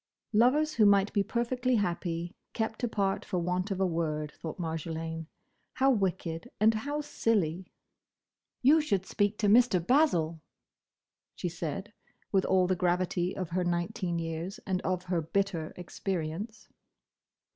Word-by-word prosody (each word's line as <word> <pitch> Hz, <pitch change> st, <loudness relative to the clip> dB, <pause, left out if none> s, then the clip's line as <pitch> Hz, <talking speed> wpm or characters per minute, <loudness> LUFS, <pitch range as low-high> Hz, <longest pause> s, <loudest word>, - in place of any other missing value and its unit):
Lovers 275 Hz, +8 st, +4 dB
who 215 Hz, -3 st, +5 dB
might 200 Hz, 0 st, +4 dB
be 205 Hz, -, +3 dB
perfectly 245 Hz, +3 st, 0 dB
happy, 175 Hz, -3 st, -1 dB, 0.2 s
kept 220 Hz, +1 st, -2 dB
apart 200 Hz, -4 st, 0 dB
for 185 Hz, -, -3 dB
want 180 Hz, +3 st, -1 dB
of 195 Hz, -2 st, -2 dB
a 190 Hz, -, +3 dB
word, 155 Hz, -3 st, -1 dB
thought 160 Hz, -, -6 dB
Marjolaine. 160 Hz, -1 st, -4 dB, 0.5 s
How 270 Hz, +1 st, +4 dB
wicked, 180 Hz, -6 st, -1 dB
and 220 Hz, +2 st, +5 dB
how 285 Hz, +7 st, -2 dB
silly! 190 Hz, -, 0 dB, 0.9 s
"You 305 Hz, +5 st, +6 dB
should 200 Hz, -11 st, 0 dB
speak 205 Hz, +1 st, 0 dB
to 210 Hz, -, +1 dB
Mr. 235 Hz, -1 st, +6 dB
Basil," 170 Hz, -, +2 dB, 0.9 s
she 180 Hz, -, -3 dB
said, 175 Hz, +5 st, -5 dB, 0.4 s
with 195 Hz, -2 st, +3 dB
all 185 Hz, -1 st, +4 dB
the 185 Hz, +1 st, +1 dB
gravity 180 Hz, 0 st, 0 dB
of 185 Hz, -3 st, -3 dB
her 180 Hz, +1 st, +1 dB
nineteen 175 Hz, 0 st, -1 dB
years 165 Hz, +3 st, -4 dB
and 185 Hz, -2 st, -1 dB
of 185 Hz, -1 st, -1 dB
her 180 Hz, -2 st, 0 dB
bitter 170 Hz, -1 st, -1 dB
experience. 185 Hz, +4 st, -4 dB
185 Hz, 140 wpm, -30 LUFS, 170-215 Hz, 0.9 s, You